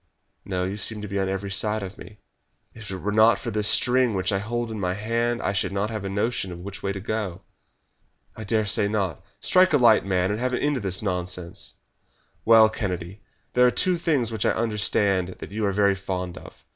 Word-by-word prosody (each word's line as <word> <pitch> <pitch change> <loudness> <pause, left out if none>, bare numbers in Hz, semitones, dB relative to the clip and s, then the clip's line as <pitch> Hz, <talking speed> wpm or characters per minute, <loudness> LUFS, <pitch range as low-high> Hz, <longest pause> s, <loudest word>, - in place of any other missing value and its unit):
"No; 90 -2 -2
you 95 +2 -3
seem 105 +1 -3
to - - -4
be 100 0 -2
on 95 0 0
every 95 +1 -3
side 105 +2 0
of 95 +1 -8
me." 105 - -12 0.6
"If 115 -3 -10
it 95 - -4
were 100 +3 -3
not 110 +2 +5
for 120 - -5
this 105 -1 +1
string 125 -2 +3
which 95 0 0
I 100 - +1
hold 120 +2 -3
in 110 - -5
my 90 -1 -1
hand 115 +3 -1
I 100 - 0
should 95 -1 0
not 100 +3 -1
have 110 -2 -4
a 100 - -3
notion 95 -4 -2
which 100 0 -7
way 100 - -1
to 100 - -5
go." 100 -3 -3 0.9
"I 110 - -7
dare 110 +1 +1
say 100 0 +2
not. 100 -7 -2 0.2
Strike 185 -2 +4
a - - +6
light, 120 -4 +5
man, 95 0 +1
and 105 - -2
have 130 +1 -1
an - - -2
end 145 0 +1
of - - -4
this 95 +1 -2
nonsense." 90 -1 -4 0.7
"Well, 115 -1 +8
Kennedy, 95 -3 -4 0.3
there 125 0 +5
are - - +5
two 180 +7 +1
things 140 -9 +1
which 110 -3 -2
I - - +3
understand 100 -4 0
that - - -9
you 105 0 -1
are - - +1
very 100 0 +3
fond 90 -2 -4
of. - - -13
105 Hz, 225 wpm, -25 LUFS, 95-115 Hz, 0.9 s, Well